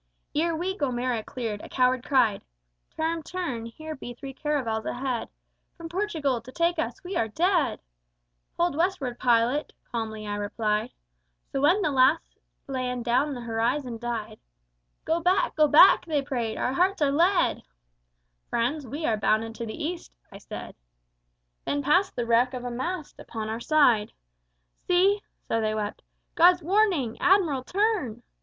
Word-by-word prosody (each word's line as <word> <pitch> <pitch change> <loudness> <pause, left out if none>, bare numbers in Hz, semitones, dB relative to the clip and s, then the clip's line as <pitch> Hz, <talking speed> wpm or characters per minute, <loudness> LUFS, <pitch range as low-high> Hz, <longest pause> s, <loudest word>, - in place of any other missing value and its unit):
"Ere 330 +2 +1
we 365 +4 -2
Gomera 250 - -1
cleared, 220 -5 -5
a - - -10
coward 255 -1 +2
cried, 245 -7 +2 0.6
Turn, 325 +1 -1
turn: 305 -10 -4
here 310 +7 -8
be 245 -4 -8
three 270 +2 -8
caravels 260 -7 -1
ahead, 250 -2 -3 0.5
From 335 -1 -8
Portugal, 325 - -1
to 250 +3 -12
take 340 +3 +1
us: 390 +5 -3
we 365 +1 -5
are 225 - +1
dead! 340 - +1 0.8
Hold 345 -3 +1
Westward, 320 -8 -1
pilot, 245 +3 +2 0.2
calmly 220 -2 -4
I 205 0 -3
replied. 210 +2 -1 0.6
So 270 - -1
when 350 +8 +4
the 305 - +1
last 270 +4 +2 0.3
land 250 -3 -3
down 265 +4 +1
the 245 - -6
horizon 235 +2 -1
died, 235 -2 -4 0.7
Go 325 +1 +1
back, 365 +3 +1
go 305 -1 +5
back! 335 +5 +7
they 295 -3 0
prayed: 240 -5 -3
our 255 - -1
hearts 370 +6 +2
are 280 - +3
lead. 345 +6 +2 0.9
Friends, 255 +5 -1
we 295 +7 -4
are 220 -5 +1
bound 215 +2 +2
into 225 0 -6
the 300 +9 -3
West, 355 - -10 0.2
I - - -10
said. - - -8 0.9
Then 285 0 -1
passed 360 +8 +2
the 240 - -1
wreck 240 +3 +3
of 250 0 -6
a 245 - -3
mast 310 +6 -4
upon 220 -1 -6
our 220 +1 -3
side. 245 -6 +3 0.7
See 385 +3 +3 0.2
(so 225 - -1
they 215 0 0
wept) 210 -1 -4 0.3
_God's 350 +1 +5
Warning! 360 - +2
Admiral, 350 -8 +3
turn! 360 - -1
270 Hz, 155 wpm, -26 LUFS, 235-335 Hz, 0.9 s, back